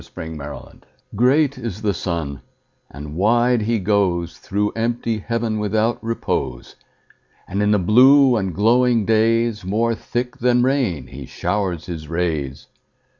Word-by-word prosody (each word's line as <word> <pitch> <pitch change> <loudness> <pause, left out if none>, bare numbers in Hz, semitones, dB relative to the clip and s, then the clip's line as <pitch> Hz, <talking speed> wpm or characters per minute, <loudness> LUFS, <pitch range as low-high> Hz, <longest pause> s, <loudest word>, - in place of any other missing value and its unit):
Summer 80 0 -8
Sun 75 -1 -9 0.3
GREAT 135 +4 +2
is 110 -3 -6
the 105 -2 +1
sun, 80 -5 -4 0.5
and 75 +1 -9
wide 120 +5 +2
he 115 +1 0
goesThrough 100 +1 -1
empty 115 -1 -1
heaven 115 0 -2
without 110 +3 0
repose; 110 - -3 0.7
And 100 +2 -2
in 105 - +2
the 105 - +4
blue 130 +7 +5
and 95 -4 -1
glowing 115 +4 +2
daysMore 115 0 +1
thick 125 +2 -4
than 125 0 +2
rain 130 - 0
he 65 -1 -10
showers 95 -5 -2
his 80 -4 -7
rays. 80 -5 -3
105 Hz, 125 wpm, -20 LUFS, 90-120 Hz, 0.7 s, blue